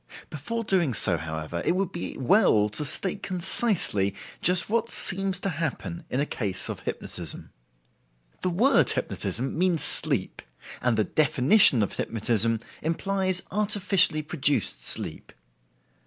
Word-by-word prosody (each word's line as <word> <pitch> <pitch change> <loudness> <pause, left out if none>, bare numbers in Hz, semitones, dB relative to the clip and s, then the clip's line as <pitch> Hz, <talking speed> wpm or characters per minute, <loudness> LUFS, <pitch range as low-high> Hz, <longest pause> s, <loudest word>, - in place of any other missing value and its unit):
Before 230 +11 -5
doing 175 - 0
so, 95 -3 +1
however, 80 +1 -6
it - - 0
would 190 -1 -2
be 175 - -6
well 130 - +2
to 105 +8 -3
state 190 +7 -1
concisely 175 - +2 0.3
just 180 +1 +2
what 230 +2 -1
seems 190 -3 0
to 195 - -1
happen 165 +1 -5
in 130 - -2
a 145 - 0
case 100 -9 -4
of - - -8
hypnotism. - - -7 0.9
The 185 - -1
word 230 +11 +2
hypnotism 130 +3 -3
means 175 -1 +2
sleep, - - +2 0.4
and 120 -3 0
the 110 - +2
definition 140 - +3
of 100 - -4
hypnotism 115 0 0 0.2
implies 185 +3 +1
artificially 195 -6 +2
produced 145 -2 0
sleep. - - +1
165 Hz, 130 wpm, -25 LUFS, 115-195 Hz, 0.9 s, definition